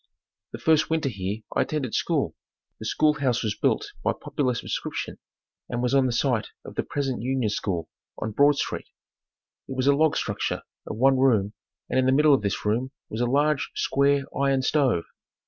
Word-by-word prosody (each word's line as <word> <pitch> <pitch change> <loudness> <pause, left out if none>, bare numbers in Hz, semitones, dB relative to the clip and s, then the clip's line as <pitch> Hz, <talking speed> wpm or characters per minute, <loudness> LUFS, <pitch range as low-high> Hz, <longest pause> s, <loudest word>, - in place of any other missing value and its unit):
The - - -6
first 155 +6 +3
winter 160 -3 +1
here 100 0 -4
I - - +3
attended 140 -7 -2
school. - - 0 0.4
The 110 - -5
school 155 +5 +3
house 125 -4 +1
was 110 -2 0
built - - 0
by - - +2
popular 130 -4 -1
subscription - - -4 0.5
and 120 0 -2
was 125 - +1
on 135 -1 +4
the - - 0
site 120 -1 +1 0.2
of - - -8
the - - 0
present 135 -3 -2
Union 125 -3 0
School 85 -7 -2 0.3
on 110 - -3
Broad 145 +6 +5
Street. - - -3 0.8
It 130 - -5
was 130 - +1
a 140 - +6
log 155 +1 +3
structure - - -2 0.2
of 110 - -5
one 135 +2 +4
room, 110 -6 +3 0.3
and 130 - +1
in 130 - +2
the - - +5
middle 150 +1 +5
of 135 - +3
this 100 0 -2
room 115 +5 +1 0.2
was 110 - -3
a 120 - +2
large, 145 +3 +2
square, 140 0 +2
iron 135 -1 +2
stove. 130 - +2
130 Hz, 190 wpm, -25 LUFS, 115-140 Hz, 0.8 s, a